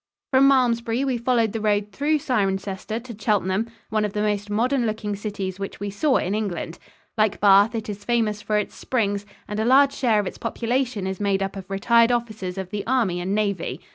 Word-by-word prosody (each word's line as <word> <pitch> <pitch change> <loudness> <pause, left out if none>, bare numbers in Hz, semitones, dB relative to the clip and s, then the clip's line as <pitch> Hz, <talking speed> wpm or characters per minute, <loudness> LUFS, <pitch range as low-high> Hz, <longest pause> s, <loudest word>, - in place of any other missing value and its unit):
From 270 0 +6
Malmesbury 245 -2 +2
we 255 -3 -1
followed 235 -2 +2
the 225 - -4
road 210 -1 +1
through 290 +9 +1
Cirencester 200 -4 -2
to 245 -3 -8
Cheltenham, 205 0 0 0.2
one 215 -1 +1
of 210 -1 -2
the 210 - -1
most 205 -1 -1
modern 240 +4 +1
looking 215 -1 -3
cities 200 -2 -5
which 195 - -6
we 205 0 -4
saw 260 +7 +2
in 190 - -1
England. 190 -6 -3 0.4
Like 215 -1 +2
Bath, 205 +3 +5
it 220 -1 -4
is 205 -1 -6
famous 220 -2 0
for 210 0 0
its 210 - -2
springs, 205 -5 -1 0.2
and 210 +1 -4
a - - +1
large 270 +4 +5
share 230 -5 +2
of 205 - -1
its - - -6
population 235 -2 -1
is 190 -1 -3
made 200 -1 +1
up 195 +1 -4
of 190 -1 -8
retired 230 +4 +3
officers 215 -6 -3
of 190 -1 -5
the 205 -1 -3
army 230 -9 +1
and 190 +3 -1
navy. 200 -4 -1
210 Hz, 205 wpm, -23 LUFS, 200-235 Hz, 0.4 s, From